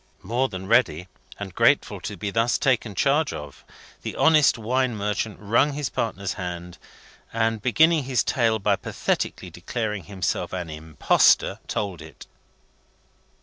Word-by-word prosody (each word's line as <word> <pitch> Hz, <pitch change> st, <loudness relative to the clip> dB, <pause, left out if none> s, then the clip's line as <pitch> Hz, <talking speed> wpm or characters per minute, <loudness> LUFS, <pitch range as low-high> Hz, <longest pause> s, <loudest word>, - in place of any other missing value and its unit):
More 125 Hz, +6 st, 0 dB
than 95 Hz, -1 st, -7 dB
ready 95 Hz, -7 st, +2 dB, 0.3 s
and -, -, -7 dB
grateful -, -, +2 dB
to -, -, -6 dB
be 100 Hz, -1 st, -4 dB
thus 115 Hz, +2 st, +1 dB
taken 120 Hz, -6 st, 0 dB
charge 145 Hz, +1 st, +2 dB
of, 75 Hz, -2 st, -9 dB, 0.4 s
the -, -, -5 dB
honest 155 Hz, -5 st, +4 dB
wine 125 Hz, +2 st, 0 dB
merchant 105 Hz, +1 st, -2 dB
wrung 115 Hz, +8 st, +2 dB
his 145 Hz, -1 st, -3 dB
partner's 100 Hz, -4 st, -2 dB
hand, 90 Hz, -2 st, -7 dB, 0.5 s
and, 115 Hz, -1 st, 0 dB
beginning 155 Hz, +5 st, +3 dB
his 130 Hz, -2 st, +1 dB
tale 115 Hz, -3 st, +1 dB
by 105 Hz, -, +1 dB
pathetically 90 Hz, -, -3 dB
declaring 105 Hz, +2 st, -4 dB
himself 95 Hz, 0 st, -3 dB
an 90 Hz, -3 st, -4 dB
Impostor, 80 Hz, 0 st, +2 dB
told 95 Hz, -5 st, -3 dB
it. 80 Hz, 0 st, -12 dB
110 Hz, 140 wpm, -24 LUFS, 90-125 Hz, 0.5 s, honest